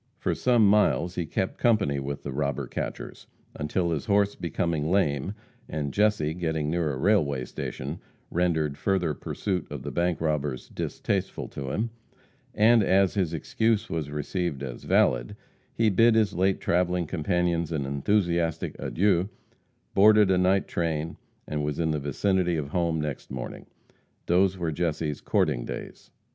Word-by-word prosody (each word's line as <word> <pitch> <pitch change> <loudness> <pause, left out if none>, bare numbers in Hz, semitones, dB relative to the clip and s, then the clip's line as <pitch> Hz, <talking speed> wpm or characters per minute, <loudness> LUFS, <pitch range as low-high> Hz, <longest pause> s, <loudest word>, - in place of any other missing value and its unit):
For - - -1
some 120 -4 +3
miles 100 -4 +3
he 85 -3 -3
kept 95 +4 -2
company 105 - +2
with 70 +1 -5
the 70 - -4
robber 70 -1 -1
catchers, - - -6 0.3
until 85 +4 -1
his 75 -4 -2
horse 100 0 +3
becoming 85 -2 -2
lame, 90 -1 +1 0.3
and 70 -3 -3
Jesse 105 -7 +2
getting 80 -3 -2
near 85 -3 0
a 65 - -4
railway 70 -7 +2
station, 70 +6 -5 0.3
rendered 80 -5 0
further 95 -6 +1
pursuit 95 +4 -3
of - - -6
bank 85 0 0
robbers 75 -5 -2
distasteful - - -3
to 70 -1 -6
him, 110 - -2 0.6
and 115 +2 +5
as 95 -1 +3
his 95 -6 0
excuse 110 +7 0
was 80 -3 -2
received 75 0 -3
as 65 -3 -7
valid, - - +2 0.4
he 115 -2 +2
bid 115 +4 +5
his 110 -2 +3
late 95 +2 +1
traveling 90 0 +1
companions 85 0 0
an 75 -4 -1
enthusiastic 85 +3 0
adieu, 95 0 +1 0.6
boarded 105 0 +6
a 95 - +3
night 95 +2 +2
train, 80 -1 -2 0.3
and 75 -1 -2
was 75 -1 -2
in 80 -1 +1
the 75 - -1
vicinity 90 +5 0
of 70 -2 -3
home 85 -1 0
next 75 -3 -4
morning. 65 -2 -6 0.6
Those 95 +2 +3
were 85 -3 -1
Jesse's 80 -2 -2
courting - - +1
days. - - -8
85 Hz, 150 wpm, -27 LUFS, 75-95 Hz, 0.6 s, boarded